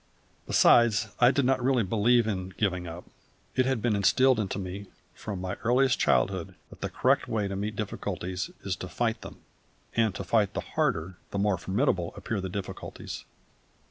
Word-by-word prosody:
Besides, 110 -3 +5
I 120 - +7
did 135 0 +2
not 130 -1 +2
really 130 -2 +3
believe 115 +4 +3
in 95 -3 -3
"giving 90 -4 0
up". 85 +2 -7 0.5
It 130 0 +3
had 130 -5 0
been 115 -3 +2
instilled 125 +5 +4
into 100 -2 -2
me 95 +1 -6 0.3
from 100 -4 -6
my 90 0 -3
earliest 125 +2 +3
childhood - - +1 0.2
that - - -14
the - - -2
correct - - +2
way 105 -3 -1
to 100 - -4
meet 105 +2 -3
difficulties 95 -3 -4
is 95 -2 -1
to 90 - -6
fight 115 -2 -1
them, - - -11 0.5
and 110 -4 +2
to - - -4
fight 100 +1 +1
the - - -1
harder 90 +3 -1
the - - -4
more 100 -2 +1
formidable 95 - 0
appear 105 -3 -3
the 95 - -4
difficulties. 95 +1 -6
105 Hz, 175 wpm, -28 LUFS, 95-120 Hz, 0.5 s, I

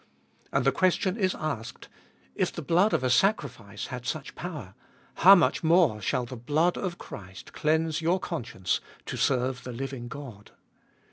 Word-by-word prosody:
And - - +1
the - - +5
question 185 0 +1
is 190 -4 0
asked 135 -8 -5 0.3
— - - -34
If - - 0
the - - -6
blood 180 +8 +3
of - - +1
a 130 - +2
sacrifice 120 - 0
had 125 -1 -5
such 155 -1 -4
power, 150 - -7 0.4
how 195 +3 +9
much 175 - +2
more 165 -10 +4
shall 125 +5 0
the 125 - -8
blood 150 +9 +1
of 180 -3 -3
Christ 95 -2 -10
cleanse 160 +1 +1
your 170 +3 +2
conscience 120 - -2 0.2
to - - -4
serve 130 -1 +1
the 125 - -6
living 130 0 -5
God? 120 -6 -10
140 Hz, 165 wpm, -27 LUFS, 120-175 Hz, 0.4 s, how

